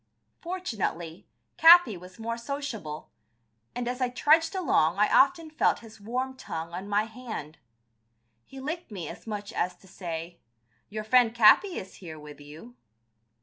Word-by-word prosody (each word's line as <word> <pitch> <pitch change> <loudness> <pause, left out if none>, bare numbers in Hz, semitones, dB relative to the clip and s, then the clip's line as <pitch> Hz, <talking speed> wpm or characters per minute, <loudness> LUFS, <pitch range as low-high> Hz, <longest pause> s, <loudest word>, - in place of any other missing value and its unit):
Fortunately, 205 - -4 0.3
Capi 330 - +8
was 180 +1 -12
more 230 +1 -3
sociable, 235 - -6 0.6
and 245 0 -3
as 250 +1 -3
I 250 - +2
trudged 320 +7 +3
along 195 - +2
I 210 +1 +4
often 325 +2 +3
felt 310 - +1
his 220 -2 -14
warm 255 +5 -3
tongue 165 -8 -6
on 185 +3 -6
my 205 +1 +2
hand. 220 - -8 0.8
He 270 - -12
licked 315 +6 -5
me 185 -7 -6
as - - -10
much 210 0 -5
as 180 -4 -1
to 190 - -21
say, 170 -2 -7 0.5
"Your 215 +1 -5
friend, 235 +1 +4
Capi, 240 - +6
is 185 - -8
here 165 -4 -9
with 150 -1 -12
you." 155 +12 -12
220 Hz, 150 wpm, -27 LUFS, 180-260 Hz, 0.8 s, Capi